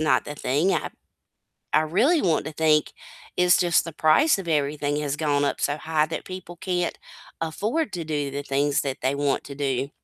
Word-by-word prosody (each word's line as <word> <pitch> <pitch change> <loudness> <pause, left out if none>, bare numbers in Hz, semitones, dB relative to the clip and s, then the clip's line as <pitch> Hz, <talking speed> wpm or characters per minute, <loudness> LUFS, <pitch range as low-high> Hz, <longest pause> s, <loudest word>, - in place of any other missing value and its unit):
not 155 -1 +2
the 150 - -6
thing, 145 +8 +1
I 165 - -1 0.9
I 155 - +5
really 230 - +2
want 165 -5 +1
to 155 - -6
think 155 -1 +2 0.4
it's 180 -1 +5
just 175 -2 +3
the 165 - -6
price 175 - +4
of 185 - -7
everything 145 -1 0
has 145 -1 -2
gone 145 -2 +1
up - - -1
so 145 - +1
high 155 0 +1
that 160 - -5
people 185 -2 -8
can't 180 -1 -2 0.4
afford 215 - -1
to 175 -3 -3
do 145 -3 -2
the 140 +1 -3
things 140 +1 +1
that 135 -2 -3
they 130 +2 +1
want 140 -1 0
to 140 - -8
do. 135 -1 -1
155 Hz, 195 wpm, -24 LUFS, 145-175 Hz, 0.9 s, I